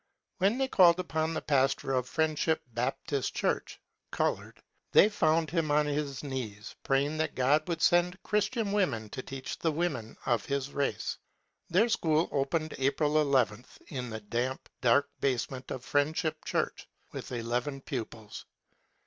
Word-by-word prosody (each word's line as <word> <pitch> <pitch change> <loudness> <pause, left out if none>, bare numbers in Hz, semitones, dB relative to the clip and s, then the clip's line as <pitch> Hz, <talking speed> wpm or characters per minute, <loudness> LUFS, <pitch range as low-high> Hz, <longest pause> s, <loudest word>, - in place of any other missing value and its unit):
When 200 +6 +3
they 270 0 +1
called 180 -7 +6
upon 160 -2 -1
the - - -3
pastor 135 -1 +1
of 125 -1 0
Friendship 160 0 +1
Baptist 135 +3 -2
Church - - -1 0.3
(colored), - - -2 0.3
they 205 - +7
found 160 -6 +2
him 165 -3 0
on 150 +1 +3
his 145 -2 -2
knees 120 -7 -5
praying 140 +3 +1
that 155 -1 -1
God 145 +5 +3
would 165 -2 -2
send 175 +1 +4
Christian 210 +1 0
women 135 - 0
to - - -4
teach 135 0 -6
the 165 - +1
women 155 -9 -2
of 120 -4 +1
his 140 0 -2
race. 140 -1 -1 0.5
Their 190 +7 +4
school 160 -7 +2
opened 150 +3 -1
April 145 +3 +1
II, 130 -7 +2 0.3
in 125 -4 -4
the 110 -1 -6
damp, 120 +5 -2
dark 140 +4 +4
basement 130 0 -1
of 130 0 -5
Friendship 155 +2 0
Church, - - -2 0.2
with - - -7
eleven 125 +4 -2
pupils. 115 -5 -6
145 Hz, 150 wpm, -30 LUFS, 130-160 Hz, 0.5 s, they